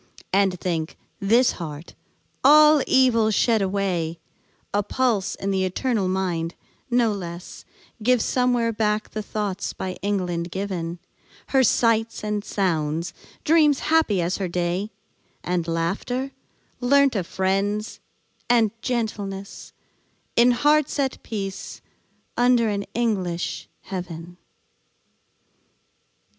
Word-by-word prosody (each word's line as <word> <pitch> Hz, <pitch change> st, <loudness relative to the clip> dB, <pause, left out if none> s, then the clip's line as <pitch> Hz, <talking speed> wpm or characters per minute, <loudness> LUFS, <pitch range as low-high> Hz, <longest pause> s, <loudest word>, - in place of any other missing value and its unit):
And 190 Hz, -2 st, +2 dB
think, 165 Hz, -3 st, -3 dB, 0.2 s
this 230 Hz, +5 st, +4 dB
heart, 155 Hz, -2 st, -8 dB, 0.5 s
all 300 Hz, +1 st, +7 dB
evil 245 Hz, -4 st, +4 dB
shed 220 Hz, +1 st, +2 dB
away, 185 Hz, -4 st, -1 dB, 0.6 s
A 205 Hz, -, +3 dB
pulse 225 Hz, -3 st, 0 dB
in 195 Hz, -, -3 dB
the 190 Hz, -1 st, +1 dB
eternal 200 Hz, +2 st, 0 dB
mind, 175 Hz, -3 st, -1 dB, 0.3 s
no 240 Hz, -2 st, +3 dB
less 175 Hz, -3 st, -7 dB, 0.4 s
Gives 245 Hz, +1 st, +3 dB
somewhere 245 Hz, -2 st, +1 dB
back 215 Hz, 0 st, 0 dB
the 215 Hz, -, -3 dB
thoughts 205 Hz, -2 st, -3 dB
by 190 Hz, -, -4 dB
England 180 Hz, -4 st, -1 dB
given; 180 Hz, -3 st, -4 dB, 0.5 s
Her 270 Hz, -, +4 dB
sights 230 Hz, -1 st, +2 dB
and 210 Hz, -1 st, -2 dB
sounds; 165 Hz, -5 st, -1 dB, 0.3 s
dreams 305 Hz, -3 st, +4 dB, 0.2 s
happy 215 Hz, -, +3 dB
as 175 Hz, +2 st, -1 dB
her 195 Hz, -, -2 dB
day; 180 Hz, +3 st, -1 dB, 0.5 s
And 175 Hz, -2 st, -1 dB
laughter, 195 Hz, +11 st, -2 dB, 0.5 s
learnt 275 Hz, +1 st, +4 dB
of 185 Hz, -4 st, -1 dB
friends; 200 Hz, +3 st, -1 dB, 0.5 s
and 230 Hz, -3 st, +4 dB
gentleness, 205 Hz, -6 st, -4 dB, 0.6 s
In 240 Hz, +1 st, +6 dB
hearts 295 Hz, +4 st, +2 dB
at 270 Hz, -2 st, -1 dB
peace, 195 Hz, -3 st, -5 dB, 0.6 s
under 245 Hz, -2 st, +3 dB
an 200 Hz, -1 st, -2 dB
English 190 Hz, -7 st, -1 dB
heaven. 175 Hz, -2 st, -7 dB
200 Hz, 110 wpm, -24 LUFS, 180-240 Hz, 0.6 s, all